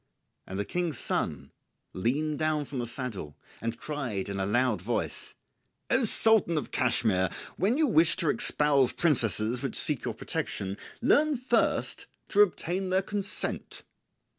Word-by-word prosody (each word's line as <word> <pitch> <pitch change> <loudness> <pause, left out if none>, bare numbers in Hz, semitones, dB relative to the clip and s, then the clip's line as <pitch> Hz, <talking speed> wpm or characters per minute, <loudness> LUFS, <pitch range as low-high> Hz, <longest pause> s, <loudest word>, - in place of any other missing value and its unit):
And 95 - -6
the 100 - -2
King's 175 - -2
son - - -2 0.4
leaned 145 +10 -1
down 155 -1 0
from 135 -1 -6
the 120 - -3
saddle 115 - -5 0.2
and 115 0 -3
cried 125 -11 -4
in 100 -1 -4
a 95 - -1
loud 120 -2 +1
voice, 115 +5 -3 0.6
"O 245 0 +3
Sultan 220 -6 +4
of 150 - -4
Cashmire, 110 -7 +2 0.2
when 215 +8 +1
you 315 - +3
wish 165 - +5
to 165 -5 +2
espouse 140 -4 +2
princesses 120 - +1
which - - -3
seek - - +2
your - - -3
protection, 95 0 -3 0.2
learn 295 +2 +3
first 250 +2 0 0.2
to 205 - +4
obtain 185 -1 0
their 190 +1 +1
consent." 200 0 -2
145 Hz, 145 wpm, -28 LUFS, 115-185 Hz, 0.6 s, wish